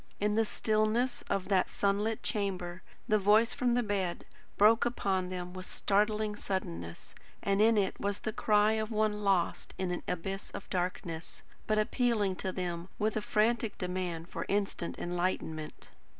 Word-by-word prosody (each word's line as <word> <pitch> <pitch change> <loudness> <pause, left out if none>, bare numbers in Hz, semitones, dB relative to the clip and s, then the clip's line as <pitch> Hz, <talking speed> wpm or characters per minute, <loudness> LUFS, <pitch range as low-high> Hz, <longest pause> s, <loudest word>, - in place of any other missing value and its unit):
In 210 +1 +1
the 225 +1 +3
stillness 220 +4 +1
of 195 -2 0
that 190 -2 +3
sunlit 205 +2 0
chamber, 185 -4 -2 0.3
the 215 0 +4
voice 210 +4 +5
from 250 -3 +1
the 245 - +2
bed 195 -5 -2 0.3
broke 220 +2 +6
upon 195 -6 0
them 180 -1 -5
with 185 0 -7
startling 210 +1 +1
suddenness; 85 - -5 0.3
and 200 +1 +2
in 225 0 +5
it 195 -2 +1
was 200 0 -1
the 220 - -2
cry 210 0 +4
of 220 0 -1
one 215 -1 0
lost 190 -4 +1
in 185 -1 -1
an 175 - -2
abyss 195 +3 -3
of - - -7
darkness, 175 -2 -3 0.2
but 215 - +2
appealing 215 -3 +2
to 190 - -2
them 175 -1 -4
with 215 +1 0
a 215 - 0
frantic 220 +1 +1
demand 180 -2 -3
for - - -5
instant 200 -4 -1
enlightenment. 175 -3 -3
200 Hz, 160 wpm, -31 LUFS, 180-215 Hz, 0.3 s, broke